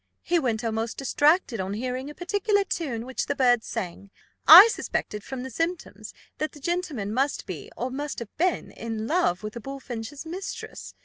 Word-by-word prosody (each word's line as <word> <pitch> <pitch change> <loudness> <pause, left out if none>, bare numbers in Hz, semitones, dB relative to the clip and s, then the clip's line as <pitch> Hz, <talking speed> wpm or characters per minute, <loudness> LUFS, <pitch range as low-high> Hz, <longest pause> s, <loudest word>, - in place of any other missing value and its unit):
He 345 0 +2
went 240 -5 -1
almost 225 0 -2
distracted 290 - +2
on 190 +1 -2
hearing 255 +4 -3
a 295 - -10
particular 405 +3 +1
tune, 265 -12 -3
which 260 0 -3
this 285 - -2
bird 245 -4 +4
sang. 195 -2 -5 0.4
I 360 +7 +13
suspected, 210 - -3
from 265 0 -6
the 260 - -7
symptoms, 330 +6 -3 0.3
that 310 - -2
the 295 - -12
gentleman 290 - -2
must 275 +4 0
be, - - -7
or 255 - -3
must 285 +2 -4
have 235 -3 -8
been, 360 +1 0
in 225 -1 -5
love 270 - +1
with 215 0 -5
the 235 - -6
bullfinch's 270 +1 -7
mistress. 365 +4 -7
265 Hz, 180 wpm, -26 LUFS, 225-330 Hz, 0.4 s, I